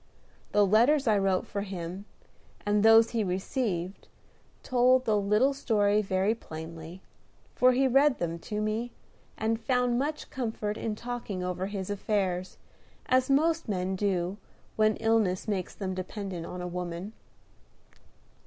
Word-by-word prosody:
The 205 -1 +4
letters 245 +9 +4
I 215 - +4
wrote 195 -1 +1
for 200 - -4
him, 190 -1 -6 0.6
and 205 0 +2
those 225 +1 +6
he 230 -2 0
received, 190 -1 -3 0.6
told 255 +1 +3
the 220 - +2
little 210 +7 +3
story 210 -6 +2
very 190 +1 +1
plainly; 165 -2 -9 0.5
for 255 0 +4
he 265 +2 +3
read 275 +1 +4
them 170 -1 -3
to 210 -1 -2
me, 225 +3 -2 0.4
and 225 +1 -1
found 250 0 +1
much 300 +2 -3
comfort 220 -4 -3
in 215 -1 -3
talking 230 -5 -5
over 180 +1 -2
his 200 -1 -4
affairs, 190 -3 -1 0.5
as 255 +1 +2
most 320 +1 +2
men 190 -1 -1
do 185 -1 -1 0.4
when 215 -1 +3
illness 225 -5 +1
makes 195 -4 -2
them 190 -2 -3
dependent 185 -2 -5
on 180 - -6
a - - -3
woman. 180 +3 -5
210 Hz, 140 wpm, -28 LUFS, 185-235 Hz, 0.6 s, those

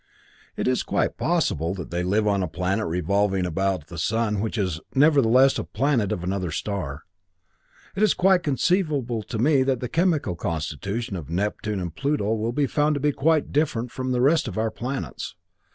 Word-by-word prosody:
It - - -1
is 130 0 +2
quite - - 0
possible 80 +5 0
that 90 -4 -7
they 85 +1 -1
live 105 +4 +1
on 100 -1 +2
a 90 - -1
planet 95 +5 -1
revolving 95 +3 +1
about 90 -1 -1
the 85 0 -8
sun 105 +3 0
which 110 +3 -2
is, 90 -6 -1 0.2
nevertheless, 135 -3 +5
a - - -2
planet 120 -4 0
of 90 - -2
another 95 -1 -2
star. 80 -4 -4 0.9
It 195 - -2
is 215 - +4
quite 190 0 +4
conceivable 145 - 0
to 110 +3 -6
me 135 +4 +3
that 130 -1 +1
the 125 - -3
chemical 155 - +1
constitution 90 - -3
of 80 -6 -7
Neptune 105 +3 -2
and 85 -3 -4
Pluto 140 -7 0
will 115 +1 -1
be 145 +3 +1
found 150 +2 +1
to - - -1
be 145 +1 +2
quite 155 +2 +1
different 125 -5 0
from 130 0 -4
that 125 - +1
of - - +1
the - - +5
rest 155 -1 +3
of 105 - -5
our 110 0 0
planets. 130 +5 -5
110 Hz, 195 wpm, -24 LUFS, 95-140 Hz, 0.9 s, nevertheless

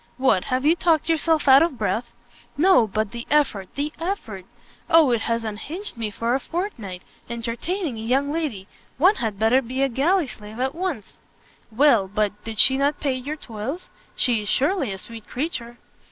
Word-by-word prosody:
"What, 255 -8 +2
have 255 +2 -1
you 320 +3 +5
talked 330 -2 +1
yourself 320 -1 +2
out 270 0 +8
of 330 -6 +1
breath?" 230 +2 -2 0.5
"No; 320 -8 +5
but 215 0 -2
the 235 0 -7
effort! 275 -10 +1
the 295 +2 -2
effort! 235 - -4 0.4
O, 320 -5 +6
it 235 -2 +1
has 230 0 -1
unhinged 295 - -4
me 225 -2 -3
for 230 +3 -2
a 265 - +2
fortnight! 250 - -5 0.3
Entertaining 235 - -3
a - - -5
young 270 +5 +1
lady! 270 -13 -3 0.3
one 370 - +4
had 220 -4 -2
better 225 +5 +3
be 260 +2 -2
a 275 - +2
galley 320 +8 +2
slave 215 -2 -10
at 265 +1 0
once!" 330 - -4 0.5
"Well 230 -4 +4
but, 210 +1 0
did 225 -1 -6
she 265 +4 +6
not 285 +1 +1
pay 280 -3 0
your 260 +4 -4
toils? 260 +5 -6 0.3
She 240 -4 +2
is 210 - -5
surely 285 - +1
a 190 - -5
sweet 225 +3 -10
creature." 245 -4 -4
255 Hz, 180 wpm, -23 LUFS, 220-305 Hz, 0.5 s, out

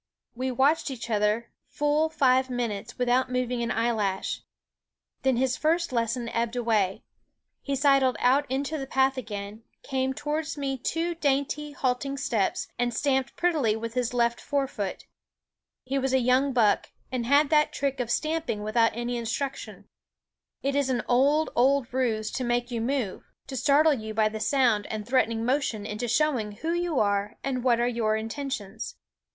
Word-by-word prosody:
We 255 +2 -2
watched 275 +6 +2
each 240 -3 -6
other 210 +2 +1 0.2
full 295 +2 +1
five 260 -4 +3
minutes 235 -3 -3
without 250 +1 +2
moving 250 -1 -1
an 235 - -1
eyelash. 220 -5 -1 0.8
Then 265 -1 +2
his 255 0 +1
first 335 +1 +1
lesson 235 0 -1
ebbed 230 +1 -1
away. 215 -6 +1 0.6
He 280 - -2
sidled 275 -2 +4
out 270 +3 +3
into 280 +4 -2
the 270 - -5
path 265 0 +2
again, 210 -3 -6 0.2
came 265 -1 -1
towards 300 +2 -3
me 275 -1 -2
two 330 +7 -2
dainty, 290 -1 -1
halting 270 +1 -1
steps, 225 -7 0
and 245 0 +1
stamped 265 -2 0
prettily 305 -11 +2
with 230 +1 -5
his 250 -1 0
left 235 -1 +1
fore 280 -1 0
foot. 205 -7 -5 0.8
He 270 +2 -1
was 265 0 -1
a 265 - +5
young 255 +3 +3
buck, 225 -5 +2 0.2
and 245 -2 -2
had 285 +2 +4
that 300 -1 +4
trick 275 -1 -2
of 245 -2 -2
stamping 310 -6 -1
without 230 +2 +2
any 240 +1 -2
instruction. 245 +4 -4 0.8
It 275 +1 0
is 280 -2 +1
an 250 -2 0
old, 285 +5 +3
old 260 0 +2
ruse 225 -4 0
to 260 - -3
make 240 0 0
you 235 -2 -2
move, 240 -5 -2 0.2
to 270 - -7
startle 290 +5 +4
you 220 -4 -5
by 215 -1 +3
the 220 0 -6
sound 235 -4 +2
and 215 -1 -5
threatening 230 -3 +1
motion 250 -5 0
into 215 +3 -3
showing 240 -5 +1
who 320 +10 -3
you 345 -4 0
are 205 +1 0
and 255 -3 -2
what 240 -2 +3
are 240 - +2
your 230 -3 +1
intentions. 225 -2 -5
255 Hz, 170 wpm, -27 LUFS, 230-275 Hz, 0.8 s, a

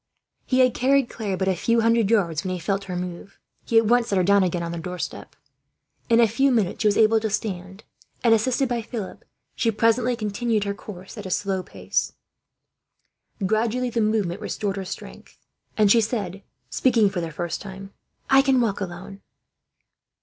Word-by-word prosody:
He 260 0 +3
had 255 -2 +4
carried 270 0 +2
Claire 205 -5 -3
but 190 +1 -1
a 190 - +2
few 230 +6 +1
hundred 230 -2 +3
yards, 170 -9 +1
when 185 - -3
he 185 - -2
felt 195 +3 -2
her 180 -2 -5
move. 180 +2 -6 0.3
He 230 - +2
at 225 - +5
once 240 +2 +3
set 200 - 0
her 185 - +3
down 200 +2 +4
again, 175 -2 0
on 170 0 -4
a 170 - -4
doorstep. 180 +1 -6 0.7
In 230 0 +5
a 235 - +6
few 270 +6 +2
minutes 220 -8 0
she 215 - +3
was 205 - +2
able 220 0 +5
to 220 0 -2
stand 195 -1 -4 0.4
and, 230 -2 +5
assisted 255 +4 +2
by 240 -1 -1
Philip, 220 -3 -7 0.3
she 230 - +1
presently 230 +3 +2
continued 220 0 -1
her 200 0 -2
course, 195 0 -10
at 205 - -6
a - - -6
slow 190 0 -1
pace. - - -2 1.3
Gradually 230 +4 0
the 230 - 0
movement 210 -3 0
restored 205 -2 -3
her 195 - -4
strength, - - -9 0.4
and 210 -2 +4
she 230 - +6
said, 205 -4 -3 0.3
speaking 230 -5 +3
for 195 -3 -2
the 165 - -4
first 170 +1 -4
time: 195 0 -9 0.3
"I 270 0 +6
can 270 -2 +3
walk 215 -4 0
alone." 195 +2 -7
210 Hz, 190 wpm, -24 LUFS, 190-230 Hz, 1.3 s, a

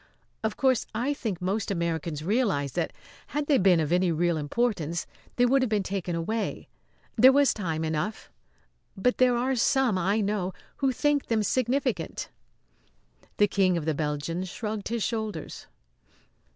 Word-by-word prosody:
Of 220 -1 -1
course 260 -3 +2
I 255 +6 0
think 220 -10 -4
most 200 +4 -1
Americans 165 -4 -2
realise 190 - +1
that, - - -2 0.4
had 295 0 -2
they 285 -2 +3
been 185 -3 +5
of 155 -1 -1
any 180 0 +3
real 170 +1 +1
importance, 170 0 -1 0.3
they 245 - +4
would 265 +2 +3
have 255 - +1
been 210 -2 +1
taken 185 -2 -3
away. 215 +7 -3 0.5
There 255 +4 +8
was 280 0 +4
time 165 -6 -3
enough. 160 +7 -3 0.7
But 250 +6 +1
there 250 -1 +4
are 260 +2 +1
some, 245 -4 +2
I 200 +5 +1
know, 200 -3 -1 0.2
who 270 -2 +1
think 290 +2 +1
them 220 -2 +1
significant." 255 +5 -1 1.1
The 205 - +5
King 185 -3 +2
of 160 - -3
the 160 - +1
Belgians 155 +5 -2
shrugged 210 0 -4
his 230 -1 -1
shoulders. 220 -8 -4
205 Hz, 155 wpm, -27 LUFS, 170-245 Hz, 1.1 s, There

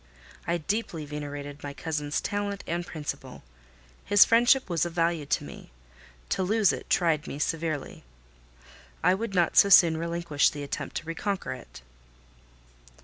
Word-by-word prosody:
I 170 +1 +1
deeply 175 -2 -3
venerated 145 -1 -7
my 140 -1 -7
cousin's 150 -2 -2
talent 205 -1 -3
and 170 +1 -2
principle. 150 -3 -7 0.6
His 205 0 +6
friendship 240 +3 +4
was 170 -4 0
of 175 -1 -3
value 165 -3 0
to - - 0
me: - - -11 0.6
to - - 0
lose 210 +2 +3
it - - -7
tried 160 -4 +1
me - - -6
severely. 155 -1 -3 1.0
I 180 - +5
would 200 +1 -3
not 175 -2 +2
so 200 - +7
soon 170 -4 +7
relinquish 170 -3 +1
the 145 -1 -7
attempt 140 - -5
to - - -4
reconquer 185 +1 -3
it. 125 - -12
170 Hz, 145 wpm, -27 LUFS, 150-195 Hz, 1.0 s, so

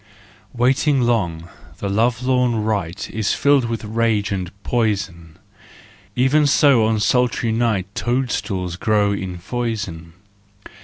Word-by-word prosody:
Waiting 130 +3 +2
long, 85 -9 -1 0.3
the 100 - -4
lovelorn 120 +2 +1
wight 100 -6 -2
Is 110 -2 -1
filled 140 -2 +3
with 115 -1 -4
rage 110 -2 0
and 95 -3 -3
poison: 95 -8 -2 0.8
Even 140 +4 +3
so 140 -5 +4
on 110 -1 +1
sultry 120 +2 +1
night 110 -4 0
Toadstools 105 -8 -2
grow 105 -1 +1
in 95 -3 -4
foison. 100 -5 -4
110 Hz, 110 wpm, -20 LUFS, 100-125 Hz, 0.8 s, so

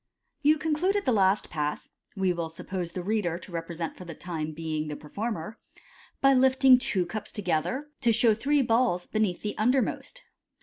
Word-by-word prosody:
— - - -50
You 310 - +5
concluded 340 +7 0
the 260 - +3
last 195 -2 +2
Pass 150 -2 -3 0.3
(we 190 -2 +1
will 170 -1 -3
suppose 175 +1 -5
the 180 - -4
reader 190 -4 0
to 180 - -12
represent 165 -1 -4
for - - -10
the 170 -3 -8
time 160 -3 -4
being 155 -1 -3
the 150 - -4
performer) 205 +5 -5 0.6
by 275 0 +6
lifting 260 0 +6
two 190 -7 0
cups 215 +4 -6
together 205 - -1
to 240 -3 +4
show 225 0 +5
three 280 +6 +2
balls 230 -7 +2
be 215 - -3
neath 195 -5 0
the 210 - -3
undermost. 260 - 0
205 Hz, 180 wpm, -27 LUFS, 170-255 Hz, 0.6 s, by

